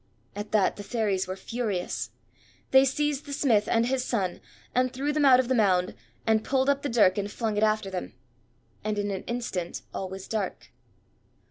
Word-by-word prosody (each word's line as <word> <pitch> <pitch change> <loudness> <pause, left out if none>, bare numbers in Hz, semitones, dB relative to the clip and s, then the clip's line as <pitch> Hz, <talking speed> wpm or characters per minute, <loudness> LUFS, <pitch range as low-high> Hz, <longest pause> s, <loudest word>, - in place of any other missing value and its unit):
At 205 +1 -6
that 210 -3 +2
the 205 - -6
Fairies 200 -4 0
were 185 - -3
furious. 190 - -3 0.6
They 265 0 +7
seized 295 +1 -1
the 285 - -5
smith 225 -7 +2
and 230 0 +3
his 255 +1 0
son 195 -8 -2 0.3
and 255 0 +2
threw 280 +3 -1
them 300 -1 +2
out 255 -2 +7
of 255 - +1
the 260 - +2
Mound, 190 -6 +3 0.3
and 220 -1 +3
pulled 265 0 +1
up 280 0 -1
the 285 - -2
dirk 210 -5 +4
and 200 0 -2
flung 220 -1 -2
it 205 - 0
after 215 -2 +1
them. 185 -1 -5 0.7
And 215 0 -1
in 205 0 -1
an 190 - -3
instant 235 -8 -3
all 190 - -4
was 190 0 -8
dark. 210 -4 -3
220 Hz, 195 wpm, -27 LUFS, 195-255 Hz, 0.7 s, They